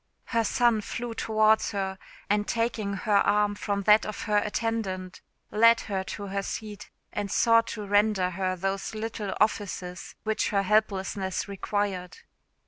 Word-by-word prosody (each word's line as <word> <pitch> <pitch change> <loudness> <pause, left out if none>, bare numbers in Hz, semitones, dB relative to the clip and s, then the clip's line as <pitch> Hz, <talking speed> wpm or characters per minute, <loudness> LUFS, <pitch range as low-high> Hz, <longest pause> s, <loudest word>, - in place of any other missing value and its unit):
Her 230 -2 +1
son 235 0 +2
flew 235 +3 -5
towards 220 0 +2
her, 190 -1 -3 0.3
and 205 0 +1
taking 230 -3 -1
her 205 +1 +2
arm 210 0 +3
from 200 -1 -2
that 210 +2 +6
of 215 - -5
her 210 -1 +1
attendant, 205 -4 -3 0.3
led 230 +2 +5
her 195 -3 -3
to 205 - -6
her 200 0 -2
seat, 210 +1 -6 0.2
and 205 -1 -3
sought 230 +3 +4
to 210 - -5
render 205 -2 +2
her 185 +1 -1
those 195 +4 -3
little 215 -2 -4
offices 190 -4 -1
which 220 0 0
her 200 -1 +1
helplessness 195 -2 0
required. 195 -2 -3
205 Hz, 145 wpm, -27 LUFS, 195-220 Hz, 0.3 s, that